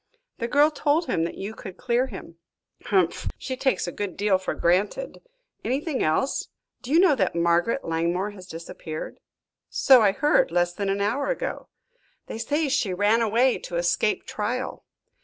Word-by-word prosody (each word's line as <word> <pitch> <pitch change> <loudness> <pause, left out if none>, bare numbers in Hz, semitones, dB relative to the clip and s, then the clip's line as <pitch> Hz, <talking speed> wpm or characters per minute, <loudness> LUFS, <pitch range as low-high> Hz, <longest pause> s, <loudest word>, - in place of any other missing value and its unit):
The 235 - -1
girl 290 +5 +4
told 305 +2 +1
him 165 - 0
that - - -6
you 200 +3 -5
could 190 -4 -10
clear 250 +1 +1
him." 190 -7 -10 0.5
"Humph! 185 -4 +1
She 260 - -4
takes 265 0 0
a 175 - -4
good 200 -1 -5
deal 200 -2 +2
for 185 - -3
granted. 200 - 0 0.4
Anything 275 +2 -1
else?" 160 - 0 0.3
"Do 250 - -9
you 320 +4 +5
know 365 -4 +6
that 190 -10 0
Margaret 170 +9 +1
Langmore 170 +5 -1
has 185 -3 -12
disappeared?" 160 -1 -7 0.5
"So 260 -4 +6
I 205 -2 +5
heard, 295 +7 +3
less 175 +1 +1
than 200 +1 -2
an 200 +1 0
hour 230 +8 0
ago." - - -3 0.6
"They 225 - -7
say 295 +6 0
she 205 -8 0
ran 210 +4 +3
away 235 +3 +2
to 175 - -7
escape 175 +4 +1
trial." 250 +5 -3
210 Hz, 170 wpm, -25 LUFS, 180-265 Hz, 0.6 s, know